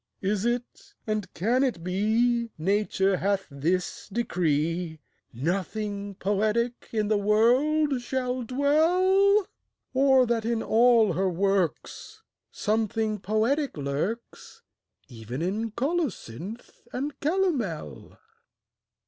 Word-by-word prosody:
Is 200 +2 0
it, 240 0 -3
and 215 -3 -2
can 235 +9 +2
it 235 -11 -1
be, 225 +6 +1
Nature 195 +2 +1
hath 195 0 0
this 170 +9 -2
decree, 165 -5 -1 0.3
Nothing 200 - -3
poetic 215 +5 -1
in 215 -2 0
the 210 -1 +2
world 255 +7 +3
shall 255 0 -2
dwell? 360 - +3 0.5
Or 265 -1 +5
that 235 -1 0
in 230 0 -1
all 230 -1 +4
her 190 +1 +1
works 195 - -2 0.3
Something 215 0 -1
poetic 225 - 0
lurks, 150 +12 -4 0.4
Even 120 +3 -6
in 210 +5 -1
colocynth 235 - -4
and 275 +3 -4
calomel? 275 - -2
220 Hz, 100 wpm, -26 LUFS, 190-250 Hz, 0.5 s, Or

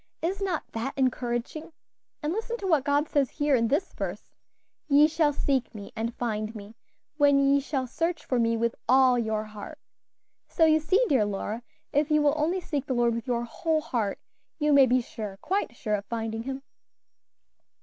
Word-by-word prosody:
Is 380 +4 -1
not 370 -5 -1
that 235 +4 -3
encouraging? 255 +4 -2 0.5
And 300 +3 0
listen 455 +3 -3
to 405 - -7
what 315 -8 +3
God 285 +2 +1
says 280 -4 +1
here 290 -2 +1
in 230 -2 +2
this 305 - 0
verse: - - -5 0.6
'Ye 295 +1 +6
shall 310 -1 +2
seek 270 -4 -1
me 200 -1 -8
and 230 +1 -3
find 215 -2 -3
me, 210 0 -9 0.4
when 285 -1 +5
ye 275 0 +4
shall 275 -2 -2
search 330 +6 -2
for 250 - 0
me 230 0 +2
with 235 +1 0 0.2
all 255 -1 +5
your 220 -2 -1
heart.' 215 +8 -9 0.7
So 325 - +3
you 315 0 +5
see, 370 +10 +2
dear 260 - +3
Lora, 205 +3 -3 0.3
if 290 +1 +2
you 305 -1 +3
will 290 -1 +4
only 330 +5 0
seek 285 -5 -3
the 260 - -1
Lord 240 -1 +2
with 230 +3 -5
your 240 -1 0
whole 315 +6 -1
heart, 225 -9 -2 0.4
you 300 -1 +2
may 275 -2 +7
be 255 +1 +3
sure, 210 -4 -7
quite 385 - -2
sure 215 -2 -3
of 200 -1 -1
finding 225 0 -3
Him." 270 +2 -5
270 Hz, 190 wpm, -27 LUFS, 230-305 Hz, 0.7 s, may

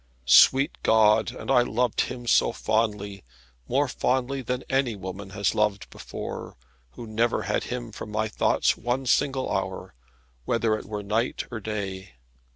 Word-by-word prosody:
Sweet 130 - +6
God, 110 -1 +4
and - - -5
I 125 -2 +6
loved 120 0 0
him 125 -1 -4
so 115 - +4
fondly, 105 -3 -1 0.4
more 140 +3 +1
fondly 130 +2 -1
than 125 +1 -3
any 135 -4 +1
woman 95 +1 -7
has 100 0 0
loved 105 -2 0
before; - - -7 0.4
who 120 - -8
never 115 +2 0
had - - -1
him 120 -2 -5
from 105 - -8
my 110 +1 -1
thoughts 110 - +1
one 125 +3 -2
single 135 +1 +1
hour, - - -4 0.5
whether 115 - +1
it - - -7
were 105 -1 -5
night 110 +4 -1
or 120 - -4
day. 100 - -5
110 Hz, 155 wpm, -26 LUFS, 105-125 Hz, 0.5 s, Sweet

